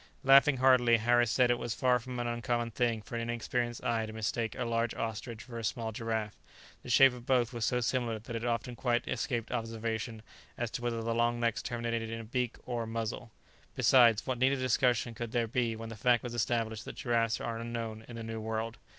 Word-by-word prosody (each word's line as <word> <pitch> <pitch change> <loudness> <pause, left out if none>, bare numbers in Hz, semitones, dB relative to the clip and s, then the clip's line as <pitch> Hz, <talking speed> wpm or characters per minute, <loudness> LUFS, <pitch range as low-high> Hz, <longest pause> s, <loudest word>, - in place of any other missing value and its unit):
Laughing 135 +1 +6
heartily, 125 -2 +5
Harris 120 +1 +3
said 125 +1 +3
it 120 - +1
was 120 -2 -3
far 125 -2 +3
from 125 +1 -7
an 120 - -2
uncommon 120 0 -1
thing 115 -1 0
for - - -13
an 115 - -1
inexperienced 120 0 -2
eye 115 -2 0
to - - -7
mistake 110 +1 -2
a 125 - -1
large 115 0 0
ostrich 115 +1 -4
for 120 -2 -7
a - - -6
small 115 0 -2
giraffe; 110 -1 -3 0.4
the - - -10
shape 135 -1 +7
of 125 -1 -11
both 125 -2 +2
was 115 -2 -1
so 125 +2 +1
similar, 120 -2 0
that 115 +2 -8
it 115 - -3
often 120 0 -2
quite 120 -1 0
escaped 120 -1 -2
observation 115 -1 -3 0.3
as 120 -2 -2
to 120 - -4
whether 115 -1 -2
the 115 0 -1
long 120 +1 +1
necks 115 -2 0
terminated 115 -1 -3
in 115 0 -4
a - - -6
beak 125 +1 -2
or 120 -2 -2
a 115 - -4
muzzle; 115 +1 -4 0.5
besides, 115 -4 +5
what 130 -3 -2
need 130 +2 +4
of - - 0
discussion 125 -2 +1
could 120 0 -6
there 120 -1 +2
be 115 0 0
when 115 0 -7
the 115 - -7
fact 120 +2 +2
was 120 -1 -5
established 115 -2 -1
that - - -8
giraffes 115 -2 0
are 115 -1 -3
unknown 115 -1 -5
in 120 - -9
the 115 - -6
New 110 0 -5
World? 110 +1 -3
115 Hz, 225 wpm, -31 LUFS, 115-120 Hz, 0.5 s, shape